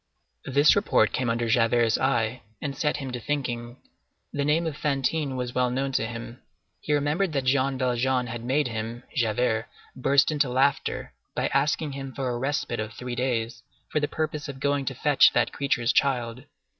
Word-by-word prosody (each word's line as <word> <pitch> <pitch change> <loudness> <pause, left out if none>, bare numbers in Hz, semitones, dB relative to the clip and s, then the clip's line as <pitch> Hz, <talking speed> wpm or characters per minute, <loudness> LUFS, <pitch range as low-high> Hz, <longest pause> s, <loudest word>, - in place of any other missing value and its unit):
This 145 +3 +5
report 200 +1 +3
came 125 -2 -1
under 115 0 0
Javert's 115 0 +3
eye 120 -2 0 0.2
and 140 -2 -4
set 150 +2 0
him 135 -2 -5
to 125 - -4
thinking. 120 -3 -3 0.6
The 140 - 0
name 155 +4 +2
of 160 -3 -2
Fantine 145 0 -1
was 125 -1 -3
well 125 0 +2
known 135 +2 -1
to 110 -4 0
him. 120 +1 -8 0.4
He - - -5
remembered 150 +5 +1
that 135 -2 0
Jean 130 +1 +2
Valjean 125 0 +1
had 120 -1 -6
made 135 +4 +1
him, 115 +1 -5
Javert, 115 -2 +1 0.3
burst 140 +3 +3
into 145 -3 +1
laughter, 135 +3 0 0.2
by - - 0
asking 150 0 +1
him 135 -1 -6
for 135 -2 -2
a 120 -1 -2
respite 135 -3 -1
of 110 +1 -4
three 125 +2 -6
days, 120 -2 -1 0.3
for 150 - +1
the 145 - 0
purpose 155 -1 -3
of 135 -1 -7
going 140 0 0
to 135 - -3
fetch 145 +2 +5
that 120 -1 +1
creature's 125 -4 +1
child. 125 -1 0
130 Hz, 180 wpm, -26 LUFS, 120-140 Hz, 0.6 s, This